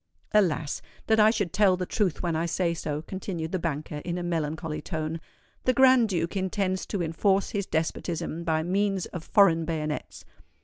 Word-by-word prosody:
"Alas! 165 Hz, -8 st, +1 dB, 0.2 s
that 220 Hz, 0 st, +3 dB
I 215 Hz, 0 st, +7 dB
should 205 Hz, -7 st, -1 dB
tell 195 Hz, -3 st, +4 dB
the 180 Hz, -, -2 dB
truth 185 Hz, -4 st, -1 dB
when 170 Hz, -2 st, 0 dB
I 165 Hz, +2 st, 0 dB
say 170 Hz, 0 st, 0 dB
so," 150 Hz, -2 st, -4 dB
continued 175 Hz, -3 st, -5 dB
the 185 Hz, -, -1 dB
banker, 155 Hz, -2 st, -3 dB
in 170 Hz, +4 st, -4 dB
a 175 Hz, -, -3 dB
melancholy 160 Hz, -2 st, -2 dB
tone. 160 Hz, 0 st, -4 dB, 0.4 s
"The 255 Hz, -, +4 dB
Grand 255 Hz, -3 st, +6 dB
Duke 170 Hz, -1 st, -1 dB
intends 190 Hz, 0 st, -1 dB
to 195 Hz, -4 st, -2 dB
enforce 190 Hz, +4 st, +1 dB
his 200 Hz, -2 st, -2 dB
despotism 165 Hz, +1 st, -2 dB
by 160 Hz, -1 st, +1 dB
means 195 Hz, +1 st, 0 dB
of 175 Hz, -, -7 dB
foreign 170 Hz, -5 st, +4 dB
bayonets. 155 Hz, -2 st, -4 dB
175 Hz, 175 wpm, -27 LUFS, 160-195 Hz, 0.4 s, I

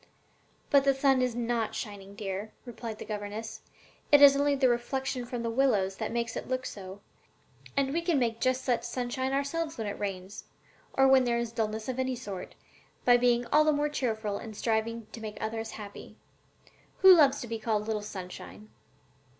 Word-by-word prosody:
"But 280 Hz, -2 st, +6 dB
the 275 Hz, -1 st, +3 dB
sun 270 Hz, -1 st, +3 dB
is 250 Hz, -2 st, 0 dB
not 235 Hz, -2 st, -1 dB
shining, 200 Hz, -2 st, -7 dB
dear," 200 Hz, 0 st, -5 dB
replied 230 Hz, -2 st, -7 dB
her -, -, -7 dB
governess: 210 Hz, +1 st, -5 dB, 0.5 s
"it 290 Hz, -, +8 dB
is 280 Hz, -1 st, +9 dB
only 285 Hz, 0 st, +2 dB
the 265 Hz, -1 st, +3 dB
reflection 250 Hz, +1 st, -1 dB
from 240 Hz, -1 st, -4 dB
the 230 Hz, -, -1 dB
willows 215 Hz, -7 st, +2 dB
that -, -, -3 dB
makes 235 Hz, 0 st, -2 dB
it -, -, -5 dB
look 255 Hz, 0 st, -2 dB
so; 195 Hz, -2 st, -8 dB, 0.8 s
and 275 Hz, 0 st, +1 dB
we 335 Hz, -, +1 dB
can 335 Hz, -3 st, +1 dB
make 230 Hz, -3 st, 0 dB
just 260 Hz, 0 st, +1 dB
such 240 Hz, -3 st, +1 dB
sunshine 245 Hz, +2 st, -3 dB
ourselves 300 Hz, +4 st, -2 dB
when 225 Hz, -, -3 dB
it 205 Hz, -, -4 dB
rains, 195 Hz, 0 st, -5 dB, 0.5 s
or 270 Hz, 0 st, +4 dB
when 265 Hz, -1 st, +6 dB
there 235 Hz, -1 st, +1 dB
is 235 Hz, -1 st, -2 dB
dullness 220 Hz, -1 st, -2 dB
of 260 Hz, 0 st, -3 dB
any 260 Hz, 0 st, 0 dB
sort, 195 Hz, -5 st, -7 dB, 0.5 s
by 245 Hz, -, +7 dB
being 245 Hz, 0 st, +3 dB
all 305 Hz, +1 st, +7 dB
the 305 Hz, -, +3 dB
more 295 Hz, 0 st, +1 dB
cheerful 220 Hz, -7 st, -2 dB
and 220 Hz, -2 st, -9 dB
striving 230 Hz, 0 st, -1 dB
to 230 Hz, -, -9 dB
make 215 Hz, -1 st, -6 dB
others 225 Hz, 0 st, -3 dB
happy. 205 Hz, -2 st, -10 dB, 0.9 s
Who 380 Hz, -1 st, +11 dB
loves 285 Hz, -4 st, +5 dB
to 240 Hz, -, -6 dB
be 225 Hz, 0 st, -4 dB
called 215 Hz, -1 st, -1 dB
'Little 215 Hz, -1 st, -2 dB
Sunshine'?" 205 Hz, +1 st, -9 dB
235 Hz, 190 wpm, -29 LUFS, 215-265 Hz, 0.9 s, Who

